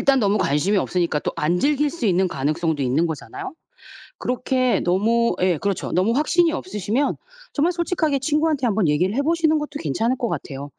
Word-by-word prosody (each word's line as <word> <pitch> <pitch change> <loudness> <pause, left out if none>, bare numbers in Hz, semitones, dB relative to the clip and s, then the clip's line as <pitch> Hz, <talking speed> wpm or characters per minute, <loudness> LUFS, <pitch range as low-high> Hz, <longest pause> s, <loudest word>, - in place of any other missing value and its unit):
일단 275 -1 +3
너무 205 -2 +2
관심이 160 +9 +1
없으니까 175 -5 0
또 - - -3
안 170 +4 +1
즐길 295 +3 +2
수 300 -9 -3
있는 185 0 +2
가능성도 155 +1 -1
있는 140 +7 +1
거잖아요. 385 - -6 0.7
그렇게 255 0 0
너무 225 +6 +2
예 180 -4 +2
그렇죠 200 +2 -2
너무 190 +6 +2
확신이 325 +4 +2
없으시면 265 - -2 0.4
정말 320 +5 +2
솔직하게 335 -4 0
친구한테 300 -1 0
한번 210 -6 +1
얘기를 180 +8 +1
해 280 - +2
보시는 315 0 +2
것도 295 0 -6
괜찮을 225 - -1
것 240 - -1
같아요. 140 +1 -5
230 Hz, 410 characters per minute, -22 LUFS, -, 0.7 s, 일단